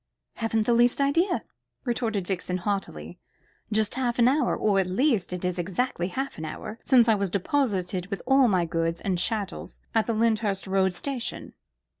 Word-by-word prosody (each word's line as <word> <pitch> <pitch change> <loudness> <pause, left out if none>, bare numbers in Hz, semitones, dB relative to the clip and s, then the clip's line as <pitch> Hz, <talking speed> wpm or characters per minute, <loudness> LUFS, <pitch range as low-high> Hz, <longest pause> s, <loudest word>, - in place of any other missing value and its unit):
"Haven't 225 -1 0
the 240 - +3
least 240 +2 +3
idea," 330 +7 +2 0.4
retorted 225 -5 -1
Vixen 180 -1 -2
haughtily. 175 - -4 0.5
"Just 215 -1 +2
half 250 -2 -1
an 240 -1 +5
hour 285 +4 +2
or, 205 -2 +2
at 190 - +1
least 220 0 +1
it 180 0 -3
is 180 0 -1
exactly 185 +1 -1
half 265 +3 -4
an 160 - -4
hour 215 +8 -7
since 245 -3 +5
I 225 - +5
was 200 -2 0
deposited 190 -3 -1
with 200 -1 -5
all 270 0 +5
my 185 -5 +2
goods 165 0 -1
and 185 -3 -1
chattels 205 0 -3
at 225 -1 +2
the 230 - 0
Lyndhurst 215 -3 +1
Road 190 -1 +1
Station." 255 +5 -4
210 Hz, 175 wpm, -26 LUFS, 185-240 Hz, 0.5 s, an